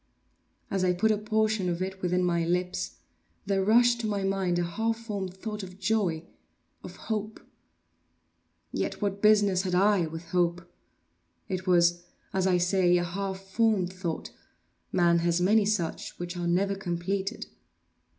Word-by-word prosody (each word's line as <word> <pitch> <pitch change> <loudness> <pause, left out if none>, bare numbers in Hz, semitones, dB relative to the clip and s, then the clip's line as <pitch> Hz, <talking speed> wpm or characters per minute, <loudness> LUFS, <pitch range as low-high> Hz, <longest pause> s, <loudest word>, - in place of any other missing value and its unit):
As 195 -1 0
I 180 -1 +3
put 220 +5 +2
a 215 - +2
portion 215 -3 0
of 170 -1 -2
it 190 +1 -4
within 180 0 +1
my 170 -1 +1
lips, 180 - -2 0.4
there 195 -1 +1
rushed 235 +3 +4
to 220 - -2
my 200 -2 -1
mind 195 -2 0
a 175 - +1
half 225 +7 -1
formed 200 -5 -5
thought 210 +2 -5
of 185 -1 -9
joy—of 185 -5 -4
hope. 215 -1 -4 1.3
Yet - - -3
what 200 -1 -2
business 205 -3 +4
had 185 -2 -1
I 195 -2 +3
with 165 +1 -8
hope? 175 0 0 0.8
It 185 0 -4
was, 175 -1 +3 0.3
as 190 0 +1
I 180 -1 +3
say, 180 0 +3
a 175 - 0
half 190 +2 -4
formed 195 -2 +1
thought—man 170 -1 -2
has 170 0 +1
many 205 +4 +4
such, 200 -6 -2
which 175 +1 -5
are 175 -1 -2
never 195 +3 +1
completed. 195 +3 -3
190 Hz, 150 wpm, -28 LUFS, 175-205 Hz, 1.3 s, rushed